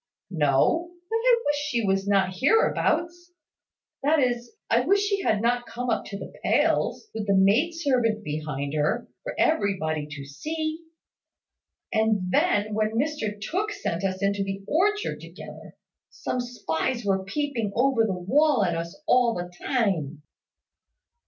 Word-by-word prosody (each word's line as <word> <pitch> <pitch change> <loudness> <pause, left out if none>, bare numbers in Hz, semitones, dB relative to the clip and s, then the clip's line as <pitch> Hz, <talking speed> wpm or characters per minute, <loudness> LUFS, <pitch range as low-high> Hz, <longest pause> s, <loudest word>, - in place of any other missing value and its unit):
"No; 165 - +2 0.2
but 450 - +2
I 470 0 +3
wish 290 0 +1
she 260 -7 -1
was 195 0 +1
not 195 -2 +2
hereabouts: 345 - +1 0.7
that 300 +3 +3
is, 245 -3 0
I 230 - +3
wish 390 +10 +3
she 400 -1 0
had 215 - +1
not 240 +1 +1
come 245 0 -3
up - - -1
to 200 - -6
the - - -9
pales, 445 - +1
with 215 -2 -4
the 200 - +3
maid 220 - +4
servant 245 -9 +1
behind 150 -3 -4
her, 155 +11 0
for - - -6
everybody 180 - +1
to 145 -2 -7
see. 315 - -4 1.1
And 220 -5 +1
then, 205 +3 +2
when 215 +1 0
Mr 235 -7 -1
Tooke 400 - -2
sent 200 - -3
us 190 0 -2
into 200 0 +1
the 195 0 -5
orchard 415 +6 +1
together, - - -11 0.3
some 250 - -4
spies 240 -1 -2
were 190 -1 +1
peeping 230 0 -2
over 250 -1 +3
the 210 -3 0
wall 260 - +3
at 170 -2 0
us 170 - -5
all 245 -2 +3
the 175 0 -5
time." 165 - 0
225 Hz, 150 wpm, -26 LUFS, 190-295 Hz, 1.1 s, maid